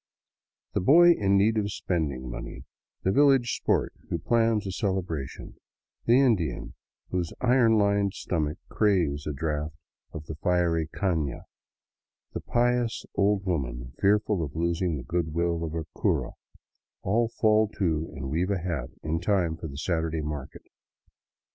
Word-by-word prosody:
The - - 0
boy 170 - +7
in 100 -10 +3
need 110 +3 +3
of 105 -1 -2
spending 75 -10 -2
money, - - -7 0.4
the 95 - +2
village 135 0 +4
sport - - 0 0.2
who 85 - -1
plans 115 +3 +1
a 95 - -3
celebration, 90 -8 -3 0.5
the 120 +3 +5
Indian 105 - +1 0.4
whose 90 -3 -1
iron 120 -3 +4
lined 100 -1 +2
stomach 80 -2 -2
craves 85 -9 +1
a - - -1
draught 75 +1 -3 0.4
of 75 -2 -8
the 80 - -6
fiery 85 0 +1
cana, 80 - -2 0.9
the - - -4
pious 120 -1 0
old 100 -1 +1
woman 60 -8 -3
fearful 100 -1 +2
of 75 -2 -5
losing 85 0 0
the 65 - -6
goodwill 85 +1 -1
of 80 -1 -4
her 80 -1 -3
cura, - - 0 0.7
all 115 +4 +1
fall 110 -2 +3
to 80 -4 0
and 65 0 -5
weave 85 +5 0
a 100 - +1
hat 85 -8 -3
in 80 +1 -1
time 90 -3 +1
for 80 - -7
the 70 -2 -9
Saturday 80 0 -1
market. 75 -2 -6
85 Hz, 145 wpm, -27 LUFS, 80-105 Hz, 0.9 s, boy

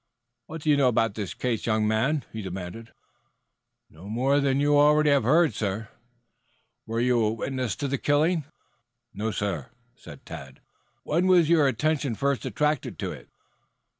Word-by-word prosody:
"What 160 -1 -8
do 155 - +3
you 145 - +4
know 135 -2 +4
about 115 -3 +1
this 105 -3 -5
case, 120 -3 -2
young 110 -1 +1
man?" 130 +8 0
he 110 - -5
demanded. 95 +4 -7 1.0
"No 85 +6 -13
more 130 +6 +2
than 140 -1 +1
you 145 +1 +3
already 150 +1 +5
have 140 -1 +4
heard, 165 0 +3
sir." 105 +1 -3 1.0
"Were 115 +1 -2
you 125 0 +2
a 105 - +1
witness 130 +1 -3
to 145 - -3
the 140 0 -2
killing?" 155 +2 +1 0.7
"No, 110 +2 -2
sir." 100 -10 -3 1.3
"When 170 +5 +1
was 175 -4 +5
your 160 -4 +4
attention 135 0 0
first 140 +2 -1
attracted 150 -2 -1
to - - -4
it?" - - -11
130 Hz, 155 wpm, -26 LUFS, 110-150 Hz, 1.3 s, already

